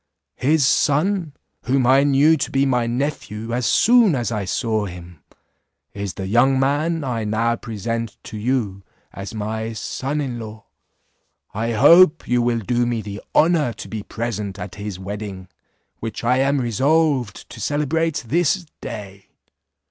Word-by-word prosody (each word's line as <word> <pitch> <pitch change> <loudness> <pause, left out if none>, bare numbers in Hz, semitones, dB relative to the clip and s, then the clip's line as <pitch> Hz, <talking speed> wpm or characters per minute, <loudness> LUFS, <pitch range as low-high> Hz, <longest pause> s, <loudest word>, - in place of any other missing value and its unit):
His 145 +1 +2
son, 155 +4 +1 0.3
whom 130 0 +2
I 135 +2 +5
knew 145 +3 +4
to 145 - -2
be 135 0 +2
my 125 -3 +1
nephew 115 -3 -3
as 120 -2 0
soon 230 - +5
as 120 -2 -2
I 105 -3 -2
saw 110 +1 -1
him, 85 -2 -10 0.7
is 100 -3 -5
the 95 - -5
young 125 +6 +3
man 150 +4 0
I 120 -4 -2
now 115 +2 0
present 115 0 -4
to - - -9
you 105 -3 -1 0.3
as 100 +2 -7
my 110 +1 -3
son 135 +6 -3
in 130 -5 -3
law. 110 0 -9 0.9
I 115 +3 -2
hope 150 - +6
you 125 0 +2
will 120 -1 0
do 120 +3 0
me 115 -2 -2
the 100 0 -7
honour 155 -6 +3
to 105 - -9
be 110 -1 -5
present 105 -3 -4
at 90 - -7
his 105 -2 -6
wedding, 95 -1 -7 0.5
which 115 0 -5
I 125 +2 +3
am 135 +1 +2
resolved 130 -1 +1
to - - -9
celebrate 150 +1 0
this 175 +7 +1 0.2
day." 100 -2 -8
120 Hz, 155 wpm, -21 LUFS, 105-140 Hz, 0.9 s, hope